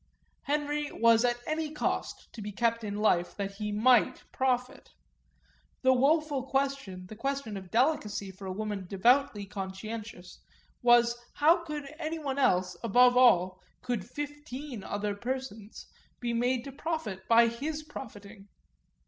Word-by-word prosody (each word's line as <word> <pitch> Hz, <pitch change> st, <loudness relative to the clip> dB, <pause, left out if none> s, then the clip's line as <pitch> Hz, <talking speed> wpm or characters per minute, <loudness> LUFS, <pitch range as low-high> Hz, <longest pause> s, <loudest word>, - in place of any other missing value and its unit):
Henry 295 Hz, 0 st, -1 dB
was 230 Hz, 0 st, +4 dB
at 240 Hz, -1 st, +2 dB
any 310 Hz, 0 st, -2 dB
cost 300 Hz, -, -3 dB
to 225 Hz, -, -8 dB
be 210 Hz, 0 st, -5 dB
kept 230 Hz, +2 st, 0 dB
in 205 Hz, -1 st, -4 dB
life 185 Hz, -5 st, +1 dB
that 200 Hz, -1 st, -4 dB
he 210 Hz, 0 st, -3 dB
might 230 Hz, +3 st, +3 dB
profit; 255 Hz, -1 st, -1 dB, 0.9 s
the 260 Hz, 0 st, +6 dB
woeful 290 Hz, +2 st, +2 dB
question, 270 Hz, -8 st, -2 dB
the 215 Hz, -, -10 dB
question 270 Hz, -2 st, -3 dB
of 190 Hz, -2 st, -8 dB
delicacy, 220 Hz, -, 0 dB
for 190 Hz, +1 st, -10 dB
a -, -, -3 dB
woman 205 Hz, -1 st, -4 dB
devoutly 210 Hz, +2 st, +2 dB
conscientious, 195 Hz, 0 st, -7 dB, 0.4 s
was 240 Hz, -1 st, +5 dB, 0.2 s
how 330 Hz, +4 st, +4 dB
could 300 Hz, -3 st, -5 dB
anyone 310 Hz, -4 st, -3 dB
else, 180 Hz, -8 st, +2 dB
how, 230 Hz, -, -3 dB
above 245 Hz, +3 st, +6 dB
all, 185 Hz, -7 st, +4 dB, 0.2 s
could 245 Hz, -6 st, -2 dB
fifteen 290 Hz, -5 st, -6 dB
other 205 Hz, 0 st, -2 dB
persons, 230 Hz, -2 st, -6 dB, 0.3 s
be 240 Hz, -1 st, -2 dB
made 245 Hz, +1 st, +1 dB
to 275 Hz, -, -8 dB
profit 270 Hz, -, -4 dB
by 230 Hz, 0 st, +6 dB
his 295 Hz, +7 st, -3 dB
profiting? 210 Hz, -8 st, -10 dB
240 Hz, 140 wpm, -29 LUFS, 205-275 Hz, 0.9 s, the